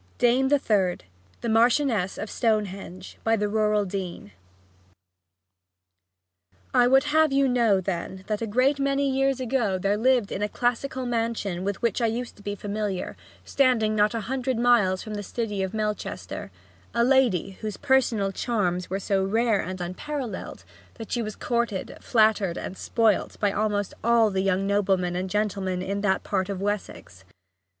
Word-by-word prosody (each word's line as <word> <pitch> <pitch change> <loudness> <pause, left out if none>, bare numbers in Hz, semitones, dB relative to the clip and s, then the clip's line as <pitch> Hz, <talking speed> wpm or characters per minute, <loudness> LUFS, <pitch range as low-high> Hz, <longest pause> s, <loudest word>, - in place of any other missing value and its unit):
DAME 250 +2 +3
THE 290 - +5
THIRD 195 -8 0 0.4
THE 235 - -2
MARCHIONESS 225 -3 +2
OF 215 - -4
STONEHENGE 200 -5 -2
By 225 0 +3
the 210 -1 0
Rural 210 -1 +1
Dean 185 - -5 2.4
I 245 - +5
would 265 +2 +5
have 310 0 +3
you 275 0 +3
know, 235 -6 +3
then, 190 0 -4
that 210 0 -2
a 230 - -2
great 255 +6 +2
many 275 0 +1
years 270 0 +1
ago 235 -6 0
there 200 +2 0
lived 245 -2 +2
in 190 - -3
a 210 - 0
classical 250 +3 -1
mansion 225 -6 -2
with 200 +2 -3
which 235 +1 +1
I 230 - +3
used 235 +2 -4
to - - -15
be 205 0 -4
familiar, 205 -1 -3 0.3
standing 240 -6 +2
not 210 +1 +2
a 230 - -1
hundred 260 +2 -2
miles 230 -6 +3
from 215 - -7
the 205 - -3
city 210 -1 -3
of 190 -1 -2
Melchester, 215 -1 -4 0.5
a 235 - +3
lady 235 -8 +2
whose 215 -2 -4
personal 245 -8 +2
charms 185 -5 -1
were 190 +2 -2
so 195 0 0
rare 220 +2 +2
and 185 0 -6
unparalleled 240 +9 -5 0.3
that 225 - -9
she 240 - 0
was 215 -2 -5
courted, 235 -5 -2
flattered, 215 -6 +2
and 185 - -5
spoilt 220 0 0
by 205 -1 +2
almost 205 -1 -1
all 230 -2 +4
the 190 0 0
young 195 0 +1
noblemen 190 -3 +1
and 185 +1 -2
gentlemen 195 -3 -1
in 200 +1 -2
that 190 -2 +1
part 190 -1 -1
of 195 -2 -3
Wessex. 200 - -4
215 Hz, 165 wpm, -25 LUFS, 195-240 Hz, 2.4 s, THE